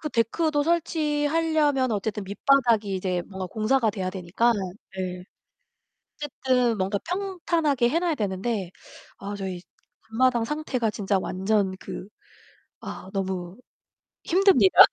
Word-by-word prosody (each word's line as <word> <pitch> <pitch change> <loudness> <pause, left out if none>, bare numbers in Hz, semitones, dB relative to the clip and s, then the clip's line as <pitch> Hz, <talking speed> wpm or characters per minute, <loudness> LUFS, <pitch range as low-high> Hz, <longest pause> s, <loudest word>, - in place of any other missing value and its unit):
그 305 - -3
데크도 290 +5 +1
설치하려면 305 -3 +1
어쨌든 210 0 -2
밑바닥이 220 -1 +2
이제 185 -1 -1
뭔가 190 -1 -5
공사가 225 +3 +1
돼야 190 -3 -3
되니까. 190 +6 +1 0.4
네. 180 -1 -4 0.9
어쨌든 255 -5 0
뭔가 195 +2 0
평탄하게 335 -9 +1
해 305 - +1
놔야 345 -2 +1
되는데 200 -3 -2 0.5
아 200 +1 -6
저희 190 -3 -5 0.5
앞마당 240 0 +3
상태가 265 -5 -1
진짜 200 -1 0
완전 190 +1 0
그 190 0 -7 0.7
아 190 - -8
너무 190 -2 -3 0.7
힘듭니다. 345 - +4
225 Hz, 260 characters per minute, -25 LUFS, 190-295 Hz, 0.9 s, 힘듭니다